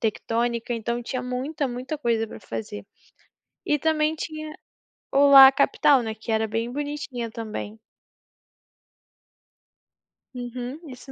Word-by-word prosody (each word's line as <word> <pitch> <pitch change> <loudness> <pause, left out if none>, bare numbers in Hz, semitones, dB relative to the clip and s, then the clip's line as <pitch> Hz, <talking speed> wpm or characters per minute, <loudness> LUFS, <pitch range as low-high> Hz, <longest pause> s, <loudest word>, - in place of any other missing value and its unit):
tectônica, 235 +1 -1
então, 235 +1 -3
tinha 255 +2 -4
muita, 265 +4 -3
muita 255 +5 -5
coisa 230 -4 0
pra 220 - -11
fazer. 110 - -7 0.8
E 295 - +1
também, 310 +1 +1
tinha 310 -1 -6 0.6
o 280 +1 +5
lá 270 -1 +10
capital, 275 -1 +3
né, 220 - -3
que 220 +1 -7
era 220 0 +1
bem 225 +2 -3
bonitinha 285 -4 -4
também. 220 -1 -6 2.5
Uhum, 250 +2 -6
isso 255 +1 -11
245 Hz, 120 wpm, -24 LUFS, 230-280 Hz, 2.5 s, lá